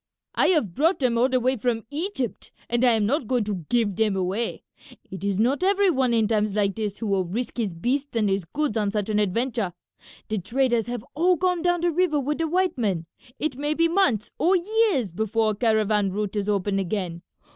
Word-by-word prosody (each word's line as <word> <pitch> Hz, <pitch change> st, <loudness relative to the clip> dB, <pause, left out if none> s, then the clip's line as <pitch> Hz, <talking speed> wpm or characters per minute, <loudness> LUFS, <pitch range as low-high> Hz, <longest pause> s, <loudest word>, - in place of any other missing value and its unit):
"I -, -, +3 dB
have 295 Hz, -, +2 dB
brought 325 Hz, -, +2 dB
them 250 Hz, -4 st, +1 dB
all 255 Hz, +2 st, +3 dB
the 255 Hz, -1 st, +2 dB
way 255 Hz, +2 st, +1 dB
from 225 Hz, 0 st, -1 dB
Egypt 305 Hz, -, -4 dB, 0.2 s
and 240 Hz, +1 st, +1 dB
I 245 Hz, -2 st, +5 dB
am 220 Hz, -2 st, +2 dB
not 265 Hz, +2 st, 0 dB
going 245 Hz, -1 st, +1 dB
to 190 Hz, -7 st, -5 dB
give 225 Hz, -5 st, +1 dB
them 215 Hz, -3 st, +2 dB
away. 190 Hz, +5 st, -2 dB, 0.5 s
It 190 Hz, -, -7 dB
is 200 Hz, -2 st, 0 dB
not 255 Hz, -, +1 dB
every 395 Hz, 0 st, +3 dB
one 260 Hz, -5 st, +1 dB
in 225 Hz, -2 st, +2 dB
times 210 Hz, -2 st, 0 dB
like 200 Hz, -2 st, +1 dB
this 210 Hz, -2 st, -3 dB
who 230 Hz, -, -5 dB
will 195 Hz, -2 st, +1 dB
risk 230 Hz, +10 st, -4 dB
his 200 Hz, -7 st, -2 dB
beasts 265 Hz, +9 st, -2 dB
and 220 Hz, -2 st, +2 dB
his 195 Hz, -1 st, 0 dB
goods 280 Hz, -, -2 dB
on 210 Hz, -2 st, +1 dB
such 210 Hz, 0 st, -2 dB
an 210 Hz, -1 st, +1 dB
adventure. 215 Hz, -1 st, -1 dB, 0.5 s
The 215 Hz, -1 st, -1 dB
traders 235 Hz, +3 st, 0 dB
have 240 Hz, -1 st, -5 dB
all 355 Hz, +5 st, +3 dB
gone 360 Hz, 0 st, 0 dB
down 350 Hz, 0 st, +1 dB
the 345 Hz, 0 st, +2 dB
river 335 Hz, -3 st, +1 dB
with 290 Hz, +3 st, -2 dB
the 325 Hz, -, +1 dB
white 360 Hz, -3 st, 0 dB
men. 190 Hz, -8 st, 0 dB, 0.3 s
It 300 Hz, -4 st, -2 dB
may 295 Hz, +2 st, -1 dB
be 330 Hz, +1 st, +3 dB
months 330 Hz, -, +1 dB
or 365 Hz, +3 st, +4 dB
years 380 Hz, -, +1 dB
before 220 Hz, +3 st, 0 dB
a -, -, -4 dB
caravan 215 Hz, -2 st, +2 dB
route 205 Hz, +1 st, -3 dB
is 205 Hz, 0 st, -1 dB
open 200 Hz, -1 st, 0 dB
again. 180 Hz, -3 st, -3 dB
230 Hz, 220 wpm, -24 LUFS, 205-290 Hz, 0.5 s, I